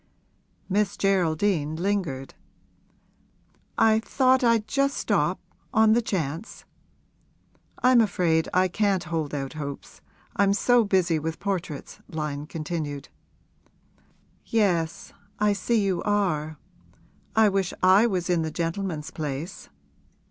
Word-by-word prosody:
Miss 205 +1 0
Geraldine 180 -4 +1
lingered. 170 -7 -2 1.4
'I 220 0 +4
thought 260 +3 +2
I'd 230 -3 +3
just 275 +3 0
stop, - - 0 0.3
on 220 0 +5
the 235 - +3
chance.' 170 -2 -4 1.2
'I'm 250 -1 +6
afraid 175 -6 +1
I 185 +1 +3
can't 195 0 0
hold 155 -3 -3
out 135 0 -4
hopes, 145 -2 -7 0.3
I'm 200 -1 +3
so 245 +3 +4
busy 185 -5 +2
with 160 +1 -4
portraits,' 180 -7 -4
Lyon 150 -2 -4
continued. 150 -3 -5 1.3
'Yes; 175 -7 0 0.2
I 210 0 +2
see 215 +1 0
you 185 -3 0
are. 165 -7 0 0.8
I 220 -1 +6
wish 195 -2 0
I 190 +5 +6
was 185 -5 -1
in 175 -2 +2
the 160 - -2
gentleman's 165 -1 -3
place.' 150 +2 -5
185 Hz, 110 wpm, -25 LUFS, 160-205 Hz, 1.4 s, I'm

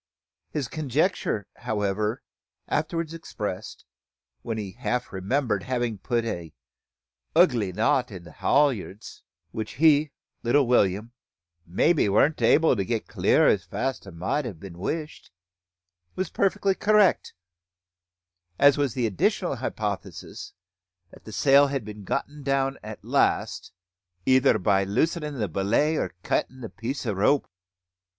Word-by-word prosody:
His 145 -5 -3
conjecture, 150 - -1
however, 105 -1 -2 0.4
afterwards 165 +1 -2
expressed, 105 - -6 0.6
when 115 -1 -4
he 100 -3 -5
half 125 +1 -3
remembered 110 +6 0
having 120 -5 -2
put 120 +2 -1
"a 85 -8 -5 0.8
ugly 125 - +4
knot 110 +6 +1
on 90 -3 -8
the 85 - -13
haulyards"; 125 - 0 0.3
which 110 +2 -5
he, 150 0 +4 0.3
little 135 +4 +3
William, 110 -2 +2 0.6
"maybe 125 - +2
warn't 140 +10 +3
able 160 -4 +4
to 100 - -1
get 115 +2 -2
clear - - +3
as - - +2
fast 130 -5 -3
as 95 - -10
mout 120 - -1
a 105 - -6
been 85 +1 -11
wished," 155 - -4 0.9
was 185 0 -3
perfectly 195 0 +1
correct; 210 0 +3 1.2
as 140 0 +5
was 140 -5 +1
also 130 - -3
the - - +2
additional 100 -5 0
hypothesis - - -5 0.6
that - - -17
the 110 - -9
sail 140 +5 +5
had 135 -5 -3
been 105 -1 -9
got - - -1 0.2
down 135 0 0
at 110 0 -9
last, - - 0 0.5
"either 130 -2 +4
by 100 0 +2
loosin' 150 - -1
the 105 -4 -1
belay 105 - +1
or 150 - -2
cuttin' 130 0 -1
the 115 - -6
piece 130 +4 -5
o' 110 - 0
rope." 105 +9 +2
120 Hz, 135 wpm, -25 LUFS, 105-145 Hz, 1.2 s, as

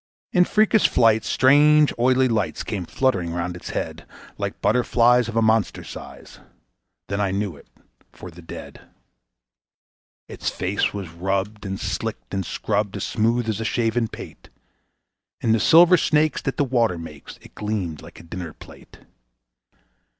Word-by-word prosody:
In 180 -1 +5
freakish 215 +1 +3
flights 110 -2 +3
strange 150 +3 +5
oily 130 +2 +3
lights 110 -4 -1
came 95 -5 -4
fluttering 95 -11 0
round 90 0 -3
its 90 - -9
head, - - -5 0.3
Like - - -5
butterflies 120 +1 +3
of 115 - -6
a 115 - +3
monster 110 -2 +1
size - - -11 0.7
then 100 +1 -2
I 100 - +1
knew 100 -2 -2
it 70 - -17 0.4
for 90 - -11
the 85 +2 -13
Dead. 80 - -10 1.5
Its - - -4
face 95 +3 -1
was 100 -4 -6
rubbed 95 +5 -3
and 95 0 -4
slicked - - -4
and 95 -1 -1
scrubbed 105 +2 -2
as 100 - -4
smooth 115 +1 0
as 110 -2 -2
a - - -1
shaven 115 +1 0
pate; - - -11 0.9
In 115 - 0
the 115 - +3
silver 175 - +6
snakes 155 -1 +1
that 135 - -3
the - - +2
water 120 -8 +1
makes 75 -3 -10
it - - -17
gleamed 100 -8 -4
like - - -13
a - - -13
dinner 85 0 -7
plate. - - -16
110 Hz, 155 wpm, -23 LUFS, 95-125 Hz, 1.5 s, silver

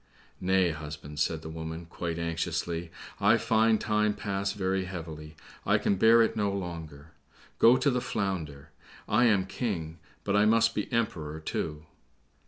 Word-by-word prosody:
"Nay, 95 -1 +2
husband," 75 -1 -8
said 80 +1 0
the 80 - -7
woman, 80 +1 -6
quite 85 0 -4
anxiously, 85 0 -2 0.3
"I - - +5
find 110 0 +3
time 105 -1 +1
pass 100 -1 -2
very 95 -1 -1
heavily, 80 -4 -8 0.3
I - - +3
can 100 - +1
bear 115 +4 +6
it 110 - 0
no 105 -2 +1
longer; 80 -5 -6 0.5
go 120 +3 +7
to 140 - +2
the 125 -1 0
Flounder—I 85 - -2
am 100 -5 +3
King, 85 -7 -4 0.2
but 100 - 0
I 105 +1 +5
must 115 +1 +4
be 105 - -3
Emperor, 90 -11 -2
too." 80 0 -4
90 Hz, 150 wpm, -29 LUFS, 80-105 Hz, 0.5 s, go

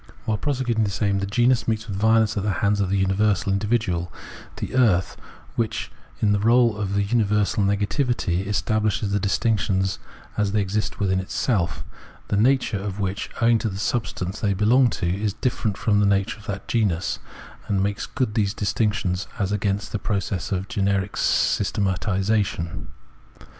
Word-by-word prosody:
While 110 -1 0
prosecuting 125 -5 0
this 100 -2 -2
aim, 100 -1 +2
the 100 - -2
genus 120 +4 +2
meets 110 -1 -1
with 100 - -4
violence 110 +1 +3
at 100 - 0
the 105 - -1 0.2
hands 100 0 +2
of 95 - 0
the 100 - +1
universal 95 0 +1
individual, 100 -5 0 0.4
the - - -5
earth,* 110 -9 +3 0.4
which 115 -2 -2 0.3
in 105 - +3
the 105 - +2
role 115 +1 +4
of 100 -1 -2
universal 105 -1 +1
negativity 100 - 0
establishes 105 0 0
the 100 - +1
distinctions 95 -2 0 0.4
as 105 -2 +1
they 110 - +2
exist 105 +2 -2
within 95 -2 +1
itself, 90 - -1 0.2
— - - -24
the - - +1
nature 120 -1 +2
of 100 0 -5
which, 100 0 -2
owing 115 0 +4
to 110 - -1
the 95 - -6
substance 105 -3 -2
they 100 -2 +1
belong 120 +6 +4
to, 90 - -3
is 100 +4 -1
different 110 -4 -1
from 105 -2 +2
the 105 - +3
nature 100 +2 +1
of 110 - -15
that 100 -1 -5
genus, 100 -8 0 0.2
— - - -19
and 95 -1 +1
makes 100 +1 -2
good 130 -6 -2
these 105 -2 0
distinctions 100 -2 0
as 100 -3 -1
against 105 0 -1
the 105 - -2
process 100 -2 -2
of 95 0 -1
generic 100 -1 0
systematisation. 95 -3 0
100 Hz, 170 wpm, -23 LUFS, 95-110 Hz, 0.4 s, role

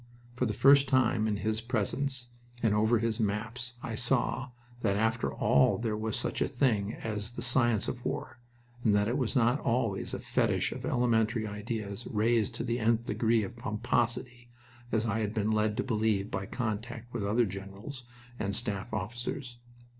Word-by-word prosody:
For 125 0 +1
the 110 - -1
first 140 +2 +6
time 120 -5 +3
in 105 - +1
his 110 +2 -1
presence 125 +2 -1 0.3
and 110 -2 +4
over 110 +3 +3
his 115 +1 0
maps, 115 +4 -2
I 115 - -4
saw 125 +2 0 0.3
that 100 -4 +1
after 110 +2 +1
all 70 - +3
there 115 -2 -1
was 110 0 -2
such - - -2
a - - +3
thing 110 -6 +1
as 110 +1 -4
the - - -4
science 120 -3 +3
of 120 -1 -4
war, - - -4 0.4
and 105 -2 +4
that 105 0 +3
it 120 - 0
was 125 +1 -1
not 125 +2 +3
always 115 -5 0
a - - -5
fetish - - +1
of - - -5
elementary 115 -2 +2
ideas 105 +1 -5
raised 110 0 +1
to - - -3
the 120 0 -1
nth 115 0 +2
degree 115 0 +2
of 100 - -6
pomposity, 120 +1 -1 0.4
as 110 0 +1
I 110 -1 0
had 105 0 -2
been 110 0 +1
led 110 0 +1
to - - +1
believe 110 -4 0
by 95 - -3
contact 120 0 -4
with 120 -4 -2
other 110 +4 +3
generals 100 +7 -7 0.4
and 100 -1 -1
staff 100 -2 -3
officers. 120 +4 -4
115 Hz, 175 wpm, -30 LUFS, 105-120 Hz, 0.4 s, first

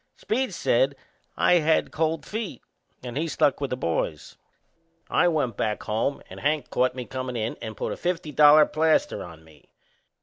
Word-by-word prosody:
Speed 255 +4 -1
said - - +2 0.4
I 175 - +4
had 160 0 +1
cold 160 0 -1
feet 210 - -5 0.4
and 125 -1 -6
he 160 +4 -1
stuck 145 -3 +1
with 140 - -1
the 125 - -3
boys. 80 - -3 0.8
I - - +4
went 145 -10 0
back 105 -1 -2
alone 115 +6 -1
and - - -10
Hank 150 -2 -1
caught 125 0 +1
me 125 -1 -5
comin' 130 -1 -5
in 110 +1 -2
and 110 -1 -7
put - - -3
a - - -8
fifty 175 -3 -2
dollar 150 +1 +7
plaster 160 - +1
on 80 -2 -12
me. 80 -3 -21
145 Hz, 175 wpm, -25 LUFS, 115-160 Hz, 0.8 s, dollar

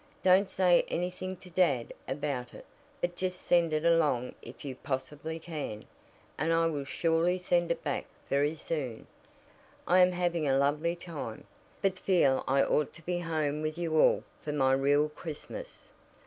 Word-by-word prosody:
Don't 190 +1 +5
say 180 -2 +4
anything 180 +1 -3
to 180 - -14
dad 145 -10 +2
about 135 -2 -3
it, - - -11 0.4
but 175 0 -1
just 185 0 -2
send 170 -2 +3
it 155 +1 0
along 150 -7 +2
if 120 +4 -11
you 135 -2 -4
possibly 145 +4 -4
can, 155 -10 -6 0.5
and 160 +3 +1
I 165 0 +3
will 145 -4 -1
surely 165 +4 +1
send 175 -1 +1
it 170 - -1
back 145 -3 -2 0.2
very 145 +3 +1
soon. 140 -7 -4 0.8
I 180 +1 +5
am 180 0 +6
having 175 -3 0
a 135 0 +3
lovely 150 +5 +1
time, 160 -10 -7 0.4
but 190 -1 +1
feel 145 -9 +3
I 135 +1 +4
ought 150 -2 +1
to 170 - -14
be 175 +1 -1
home 155 -3 -1
with 155 +1 -2
you 165 -2 -1
all - - +4 0.2
for 150 - -4
my 135 -2 +3
real 145 +2 +3
Christmas. 160 - -9
160 Hz, 165 wpm, -30 LUFS, 140-175 Hz, 0.8 s, am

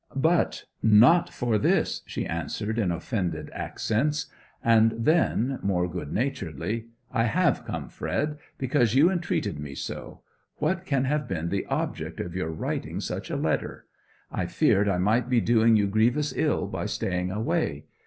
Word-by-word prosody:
'But 160 +5 +1 0.2
not 115 +11 +6
for 115 -3 0
this,' - - +1
she - - -3
answered, 105 +7 -3
in 95 -6 +1
offended 90 +2 -3
accents. 145 +6 -1 0.4
And 115 -1 +5
then, 135 -1 +2
more 90 -3 +1
good 75 -4 -6
naturedly, 105 - -2 0.2
'I 115 -3 +2
have 110 - +1
come, - - -4
Fred, 150 0 -2 0.2
because 125 -3 +1
you 155 +7 +6
entreated 175 - -1
me 70 -2 -6
so! - - -6 0.3
What 185 0 -1
can 135 -3 +1
have 150 0 0
been 85 -4 -2
the 95 +1 -2
object - - -3
of 85 - -4
your 90 -4 -2
writing 80 - -3
such - - -4
a - - -2
letter? - - -2 0.5
I - - -2
feared 100 +1 +3
I 95 - +1
might 110 +7 +2
be 125 -2 +4
doing 115 0 +4
you 105 -1 +3
grievous 120 +9 +2
ill - - +1
by - - -3
staying 90 -1 -2
away. 95 -7 -1
110 Hz, 155 wpm, -26 LUFS, 95-130 Hz, 0.5 s, not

